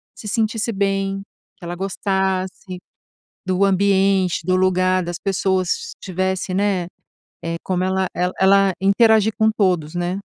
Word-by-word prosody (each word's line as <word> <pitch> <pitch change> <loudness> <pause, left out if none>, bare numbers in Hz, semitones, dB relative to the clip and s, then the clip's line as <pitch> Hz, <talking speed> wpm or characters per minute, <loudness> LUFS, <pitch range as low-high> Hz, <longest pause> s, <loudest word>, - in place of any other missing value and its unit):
se 215 - -9
sentisse 225 +1 -1
bem, 195 -1 -1 0.4
que 180 - -12
ela 175 +1 -5
gostasse, 190 -1 -2 0.7
do 185 +1 +1
ambiente, 195 -1 +2
do 185 +1 +2
lugar, 185 0 +2
das 175 0 -5
pessoas, 190 -2 0
se - - -2
tivesse, 190 0 -2
né, 190 -2 0 0.6
eh, 165 0 -2
como 185 -1 -1
ela 190 0 0
ela 180 +1 -1
ela 195 0 +5
interagir 220 +2 +4
com 220 0 +4
todos, 180 -6 +1
né. 175 +2 -2
190 Hz, 140 wpm, -20 LUFS, 185-195 Hz, 0.7 s, ela